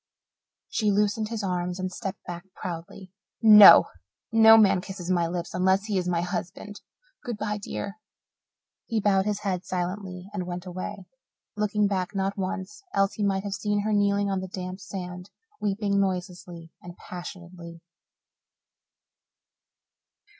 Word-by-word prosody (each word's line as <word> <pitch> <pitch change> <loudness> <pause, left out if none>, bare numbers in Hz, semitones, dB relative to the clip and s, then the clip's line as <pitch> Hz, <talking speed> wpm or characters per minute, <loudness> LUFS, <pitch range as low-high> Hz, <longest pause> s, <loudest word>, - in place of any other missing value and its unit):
She 215 -2 0
loosened 210 +1 +1
his 225 -2 -4
arms 180 -1 -2
and 185 0 -3
stepped 190 +1 -6
back 175 0 -7
proudly. 175 +2 -7 0.3
"No! 210 -3 +10 0.5
No 225 0 +8
man 195 -4 +4
kisses 185 -2 -6
my 170 -2 +2
lips 175 0 -5
unless 190 +2 +2
he 205 -3 0
is 180 - -3
to - - -1
be - - 0
my 170 - +1
husband. 180 +3 -5 0.4
Good 240 -3 -4
bye, 210 0 -3
dear." 200 +1 -6 0.9
He 225 -2 0
bowed 195 -1 +2
his 210 -1 -1
head 185 -3 -2
silently 180 0 -4
and 180 -3 -4
went 175 0 -5
away, 185 +2 -6 0.5
looking 210 0 +1
back 195 0 -2
not 195 0 -1
once, 190 - -5
else 195 +1 +2
he 210 - -3
might 195 -1 0
have 200 -1 -4
seen 205 +1 -1
her 215 +1 -1
kneeling 205 0 +2
on 190 - 0
the 190 - -5
damp 185 -1 -6
sand 180 -1 -7 0.3
weeping 200 0 0
noiselessly 180 -3 -4
and 175 0 -11
passionately. 175 -1 -10
190 Hz, 150 wpm, -26 LUFS, 180-205 Hz, 0.9 s, No